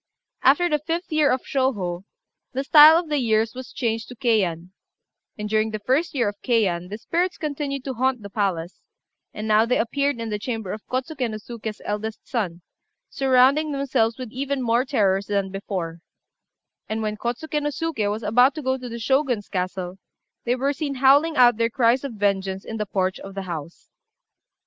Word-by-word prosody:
After 285 +7 +4
the 300 -3 +1
5th 335 +4 -4
year 310 -2 +3
of 255 - 0
Shôhô, 200 -10 -1 0.5
the 265 +2 -1
style 305 +3 +9
of 340 -1 -1
the 295 -1 0
years 225 -2 +1
was 255 -1 -8
changed 225 -2 -2
to 250 - -10
Keian; 190 -8 0 0.7
and 210 0 -4
during 215 +1 +1
the 215 -1 -4
1st 265 +10 0
year 240 -5 +2
of 205 0 -5
Keian 185 -8 +1
the 210 - -5
spirits 350 +9 -1
continued 285 -3 -3
to 265 - -4
haunt 255 -1 0
the 200 - -7
palace; 185 -5 -2 0.5
and 215 +1 -6
now 215 0 +5
they 235 +2 +1
appeared 280 +3 0
in 230 -1 -4
the 210 - -2
chamber 225 -4 -4
of 210 - -6
Kôtsuké 260 0 -2
no 215 - -4
Suké's 220 -1 -7
eldest 210 +1 -4
son, 180 -8 -3 0.5
surrounding 270 +3 +3
themselves 255 -5 0
with 255 -4 -7
even 275 +1 -2
more 240 +2 +2
terrors 200 -7 +1
than 200 -2 -1
before; 185 -4 -4 0.9
and 220 +1 -2
when 215 0 -2
Kôtsuké 270 +8 -3
no 295 - 0
Suké 295 -9 -2
was 215 +2 -3
about 245 +7 +4
to 305 - -5
go 260 0 0
to 250 -1 -7
the 235 - -6
Shogun's 245 -2 0
castle, 185 0 -3 0.5
they 245 +1 +2
were 275 +3 0
seen 285 -1 -3
howling 285 +5 +4
out 240 -3 +6
their 230 0 +1
cries 240 +2 +2
of 275 -4 -5
vengeance 195 -2 -1
in 225 - -5
the 210 -1 -3
porch 190 -1 -1
of 195 0 -10
the 195 - -4
house. 170 -2 -8
230 Hz, 190 wpm, -23 LUFS, 205-270 Hz, 0.9 s, style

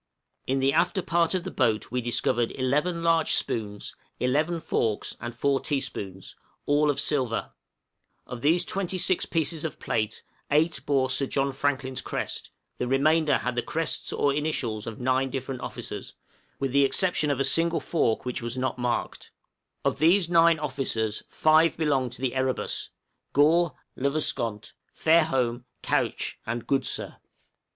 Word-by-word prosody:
In 135 - +1
the 135 +1 +2
after 175 +3 +2
part 170 +1 +1
of 180 - -1
the 185 - -5
boat 115 -5 +1
we 125 0 0
discovered 120 0 +1
eleven 150 +7 0
large 165 -1 +3
spoons, 105 -3 -2 0.2
eleven 150 +7 +1
forks, 110 -8 -1
and 120 0 -5
four 140 +2 +1
teaspoons, 105 -11 -4 0.3
all 150 +1 +3
of 145 - +1
silver; 130 -6 0 0.7
of 125 -2 -7
these 170 +4 +3
twenty 190 -1 -2
six 185 0 +2
pieces 160 -1 -1
of 160 -4 -4
plate, 110 -1 -2 0.3
eight 155 +1 +2
bore 135 -2 +2
Sir 135 +1 +1
John 135 +1 0
Franklin's 135 -1 -1
crest, - - -4 0.3
the 125 - -1
remainder 150 +3 +3
had 125 - -2
the 120 - +1
crests 165 +6 -2
or 140 - +1
initials 130 -8 -2
of 115 - -6
nine 130 +1 +1
different 130 -1 -4
officers, 125 - -6 0.4
with 135 -2 -2
the 140 +1 +4
exception 155 +1 +1
of 140 -2 0
a - - +3
single 165 +2 +4
fork 145 -9 0
which 125 -1 -3
was 120 +2 -5
not 130 0 -2
marked; 120 -1 -2 0.6
of - - +1
these 170 +4 +4
nine 170 -1 +5
officers, 130 -7 -2
five 155 +1 +4
belonged 135 -6 +1
to 130 - -9
the 130 - 0
'Erebus,' 130 -1 -1 0.4
Gore, 160 +4 +4 0.2
Le 140 +2 0
Vesconte, 115 -7 -2 0.2
Fairholme, 135 -7 +2 0.2
Couch, - - -1
and 120 0 -3
Goodsir. 135 -1 -1
140 Hz, 155 wpm, -26 LUFS, 125-160 Hz, 0.7 s, nine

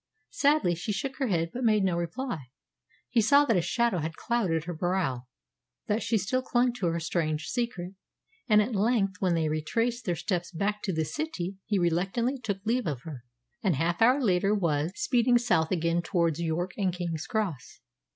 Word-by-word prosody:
Sadly 285 - +3
she 175 +6 -3
shook 260 +7 -3
her 270 - 0
head, 165 -5 0
but 255 - -4
made 215 -3 +3
no 185 -3 +1
reply. 170 - -3 0.6
He 235 - +2
saw 280 +7 +5
that 230 - +2
a 180 - +3
shadow 235 0 +1
had 160 +1 -4
clouded 190 -10 0
her 175 +1 -5
brow, 165 -8 -1 0.6
that 210 +2 0
she 230 0 +1
still 215 +6 0
clung 245 -1 +1
to 220 -8 -2
her 170 0 0
strange 160 -2 -1
secret; 215 -7 -3 0.6
and 210 -1 +6
at 235 +3 -4
length, 200 -2 +1
when 180 -3 +2
they 160 -1 +1
retraced 230 +11 -1
their 175 - 0
steps 175 +1 -2
back 205 +4 -1
to 195 - 0
the 160 -2 0
city, 195 - -4
he 205 - +1
reluctantly 195 +10 0
took 200 -4 -4
leave 240 0 +1
of 140 -6 -3
her, 135 -7 -8 0.4
and 190 -6 +2
half 165 +6 -1
an 225 - +8
hour 260 +3 +4
later 200 -3 +2
was 160 -4 0
speeding 245 -1 +3
south 180 -9 +2
again 170 -1 +1
towards 170 -3 0
York 170 +2 -1
and 190 -3 +1
King's 170 -3 -4
Cross. 195 - -3
190 Hz, 190 wpm, -28 LUFS, 165-230 Hz, 0.6 s, an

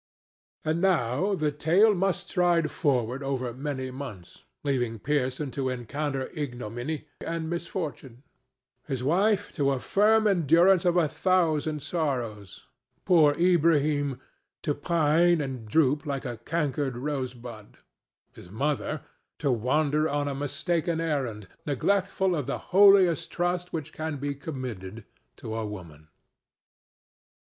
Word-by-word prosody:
And 160 +2 0
now 185 - +2
the 155 -4 0
tale 180 +9 +4
must 195 0 -1
stride 175 -4 +2
forward 130 -5 0
over 130 -3 -2
many 130 -1 -4
months, 125 -10 -9 0.2
leaving 125 -5 -1
Pearson 135 +2 -1
to 135 -1 -2
encounter 135 +3 -3
ignominy 125 0 -4 0.2
and 165 -1 -3
misfortune; 160 -7 -5 0.6
his 135 -4 -3
wife, 200 +7 +2
to 140 -2 +1
a 135 -2 0
firm 220 +8 +3
endurance 175 0 +4
of 175 0 +3
a 170 -3 +4
thousand 155 -4 +1
sorrows; 125 - -3 0.4
poor 155 -6 +5
Ilbrahim, 150 -6 +2 0.4
to 145 - +1
pine 170 +2 +3
and 130 -6 -4
droop 150 +3 +2
like 140 -1 -3
a 120 -2 -4
cankered 140 -1 -2
rose 130 -2 -3
bud; 115 -3 -11 0.6
his 90 - -13
mother, 145 +6 -2 0.4
to 140 -3 0
wander 145 +6 +1
on 145 0 -1
a 140 - -2
mistaken 160 +4 -1
errand, 130 - -2 0.2
neglectful 190 +5 +1
of 145 -5 -3
the 140 - -1 0.2
holiest 195 -4 +6
trust 175 0 -1
which 155 -4 -5
can 155 -1 -4
be 140 +1 -3
committed 120 - -7 0.3
to 110 - -7
a 115 - -2
woman. 85 -8 -8
145 Hz, 125 wpm, -27 LUFS, 130-170 Hz, 0.6 s, holiest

